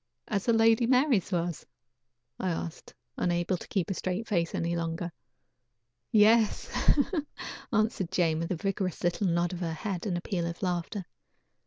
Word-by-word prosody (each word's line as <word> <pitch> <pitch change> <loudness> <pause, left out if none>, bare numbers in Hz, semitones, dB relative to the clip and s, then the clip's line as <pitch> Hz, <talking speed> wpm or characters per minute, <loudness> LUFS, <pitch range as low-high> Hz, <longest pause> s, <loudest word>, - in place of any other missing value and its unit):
"As 200 -3 -1
the 235 - +4
Lady 225 +1 +5
Mary's 255 - +3
was?" 175 -2 -2 0.7
asked 170 -3 -4 0.2
I, - - -1
unable 175 +1 +1
to - - -8
keep 195 -1 -1
a - - +1
straight 185 +4 -2
face 170 -5 0
any 170 +1 0
longer. 170 +1 -2 1.0
"Yes," 220 0 +4 1.0
answered 215 -5 +1
Jane, 165 -4 +2
with 165 - -2
a - - +1
vigorous 190 +1 -2
little 175 +3 +1
nod 170 +1 +1
of 175 - -5
her 165 -3 -2
head, 185 +4 -3
and 180 -3 0
a - - -4
peal 175 -2 -2
of 170 +2 -6
laughter. 180 +2 -2
180 Hz, 160 wpm, -29 LUFS, 170-210 Hz, 1.0 s, Lady